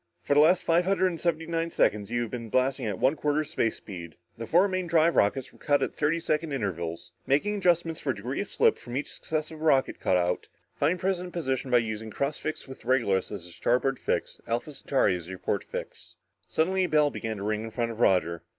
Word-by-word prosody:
For - - +1
the 145 - +5
last 170 +4 +5
five 170 +1 +3
hundred 190 0 +2
and 170 -2 -6
seventy 165 -2 0
nine 165 0 -1
seconds 105 -9 +1
you 120 0 0
have 115 - -6
been 115 -2 -5
blasting 130 0 +1
at 100 -3 -2
one 135 +4 +3
quarter 150 0 0
space 115 -6 -1
speed. 85 -5 -9 0.2
The 115 0 -7
four 180 +4 +5
main 185 -2 -2
drive 165 0 +3
rockets 125 +6 +1
were - - -20
cut 145 -1 +2
out - - 0
at - - -31
thirty 155 +3 +1
second 155 -2 -1
intervals. 85 -9 -3 0.2
Making 150 +10 +2
adjustment 170 -4 +2
for 140 - -1
degree 120 - -3
of 200 - -4
slip 460 -2 +3
on 120 +2 -3
each 145 - -4
successive 155 0 -4
rocket 145 -4 +2
cutout, 90 -1 +1 0.3
find 155 +6 +1
present 180 -1 -2
position 135 -6 -2
by 125 - +5
using 110 -1 -2
cross 140 +7 -2
fix 155 -2 -4
with 130 - -11
Regulus 115 -7 +1
as 100 -5 -6
your 90 - -11
starboard 125 +7 +1
fix, - - -2
Alpha 120 +6 -2
Centauri 130 -8 +1
as 85 -2 -7
your 95 - -6
port - - -2
fix." - - -8 0.3
Suddenly 185 +3 +1
a - - -4
bell 150 -1 +4
began 110 -2 -4
to 100 - -6
ring 105 +1 -1
in - - -5
front 115 +1 -2
of 115 - -9
Roger. 85 -6 +2
135 Hz, 225 wpm, -27 LUFS, 110-165 Hz, 0.3 s, the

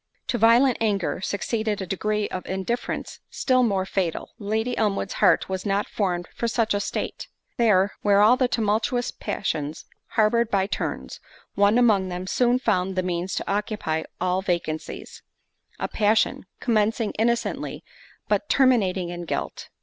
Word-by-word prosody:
To 240 - 0
violent 235 +3 +5
anger, 200 -5 0
succeeded 215 +2 -2
a 190 - -3
degree 210 +3 -1
of 185 - -5
indifference 190 +6 -3
still 255 -1 +2
more 200 -6 +1
fatal—Lady 210 +5 -2
Elmwood's 200 -3 0
heart - - +4
was 190 -1 -3
not 200 0 0
formed 175 -4 -2
for 235 - -2
such 230 -1 +1
a 205 - +1
state—there, 205 0 -1
where 200 -1 +4
all 215 +4 +6
the 255 -1 +2
tumultuous 230 +2 0
passions 155 -5 -3 0.3
harboured 225 +1 +3
by 195 -3 +2
turns, 200 - -4 0.3
one 205 +3 +4
among 210 -6 +3
them 180 +1 -4
soon 245 +5 +2
found 190 -6 0
the 185 - 0
means 180 +1 -2
to - - -3
occupy 200 -6 -1 0.2
all 185 +1 +1
vacancies: 170 -4 -4 0.6
a - - -1
passion, 215 -2 +1
commencing 220 -1 +1
innocently, 235 +1 -1 0.4
but - - 0
terminating 200 -10 +3
in 175 0 -6
guilt. - - -4
205 Hz, 140 wpm, -24 LUFS, 185-230 Hz, 0.6 s, all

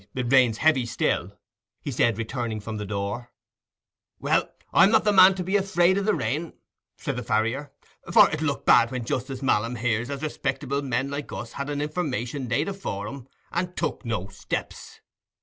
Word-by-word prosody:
"Why, 130 - -2
it 125 +1 -1
rains 125 -4 +5
heavy 135 -5 +3
still," - - -1 0.4
he 145 - -5
said, 115 -3 +2
returning 115 -1 -3
from 110 +1 -6
the 105 -1 -5
door. 100 +4 -4 0.9
"Well, - - +1 0.2
I'm 190 - +7
not 225 - +4
the 210 - +3
man 190 -1 +7
to 185 - -3
be 190 +3 -1
afraid 190 -2 +3
o' 200 - +1
the 210 +1 +1
rain," 150 +10 -2 0.4
said - - -3
the - - -2
farrier. 115 +7 -1 0.4
"For - - +8
it'll 160 0 -1
look 140 - -3
bad 120 -1 +6
when 125 -2 -4
Justice 130 +3 -3
Malam 115 -1 +1
hears 115 +1 -1
as 140 0 -5
respectable 140 -2 -2
men 135 0 -1
like 145 0 -5
us - - -6
had 140 +1 -4
a - - -2
information 145 -4 -3
laid 145 +6 +1
before 165 - -4
'em 135 +1 -8 0.2
and 180 +1 -3
took - - -2
no 110 -6 -3
steps." 100 - -6
135 Hz, 185 wpm, -25 LUFS, 115-155 Hz, 0.9 s, For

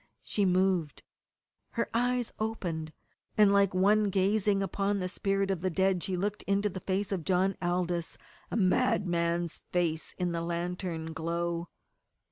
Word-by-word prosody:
She 205 - 0
moved; 185 -4 +1 0.7
her - - 0
eyes 245 0 +1
opened, 175 -8 -3 0.5
and 210 -2 +6
like 200 -2 +3
one 210 +3 +4
gazing 195 +1 +2
upon 200 +1 0
the 185 -2 -1
spirit 195 +1 0
of 185 -4 -2
the 185 - +1
dead 190 +1 +1
she 185 0 -2
looked 205 +3 -2
into 200 +1 +2
the 190 0 -6
face 195 +2 -1
of 185 -4 -1
John 190 +2 +2
Aldous, 175 -1 -1 0.3
a - - -2
madman's 175 -3 +1
face 165 -3 0
in 180 -1 0
the 170 0 -2
lantern 170 -1 -3
glow. 170 +1 -2
185 Hz, 145 wpm, -30 LUFS, 170-200 Hz, 0.7 s, and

